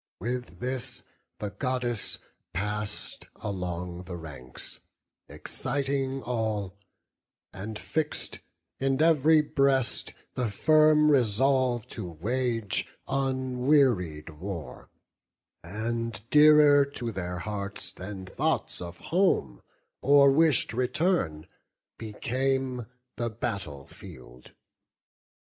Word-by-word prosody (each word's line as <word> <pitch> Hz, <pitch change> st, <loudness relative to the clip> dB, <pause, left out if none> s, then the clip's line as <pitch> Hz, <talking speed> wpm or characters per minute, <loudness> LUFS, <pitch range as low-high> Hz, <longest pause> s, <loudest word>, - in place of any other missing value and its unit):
With 125 Hz, +4 st, -4 dB
this 125 Hz, 0 st, -2 dB, 0.3 s
the 105 Hz, -1 st, -4 dB
Goddess 120 Hz, +1 st, -1 dB, 0.4 s
pass'd 105 Hz, +2 st, -4 dB
along 90 Hz, -2 st, -4 dB
the 90 Hz, -1 st, -6 dB
ranks, 70 Hz, -7 st, -9 dB, 0.5 s
Exciting 135 Hz, 0 st, -2 dB
all; 110 Hz, -5 st, -2 dB, 0.8 s
and 105 Hz, +3 st, -6 dB
fix'd 155 Hz, +6 st, -2 dB, 0.4 s
in 135 Hz, 0 st, +1 dB
every 160 Hz, -1 st, +5 dB
breast 135 Hz, -3 st, +1 dB, 0.2 s
The 125 Hz, -3 st, -1 dB
firm 155 Hz, +6 st, +5 dB
resolve 130 Hz, -1 st, +3 dB
to -, -, -6 dB
wage 115 Hz, +5 st, -1 dB, 0.2 s
unwearied 130 Hz, -, +1 dB
war; 85 Hz, -10 st, -7 dB, 0.7 s
And 115 Hz, +5 st, -3 dB
dearer 150 Hz, -1 st, +7 dB
to 125 Hz, -4 st, -5 dB
their 90 Hz, -3 st, -4 dB
hearts 100 Hz, +1 st, -5 dB
than 95 Hz, 0 st, -7 dB
thoughts 95 Hz, -, -1 dB
of 85 Hz, 0 st, -7 dB, 0.2 s
home 170 Hz, -, +2 dB, 0.4 s
Or 140 Hz, 0 st, +6 dB
wish'd 150 Hz, -5 st, +3 dB
return, 125 Hz, -, 0 dB, 0.5 s
became 130 Hz, +2 st, -1 dB, 0.3 s
the 120 Hz, 0 st, -1 dB
battle 95 Hz, -10 st, -4 dB
field. 60 Hz, -2 st, -13 dB
120 Hz, 90 wpm, -28 LUFS, 95-135 Hz, 0.8 s, dearer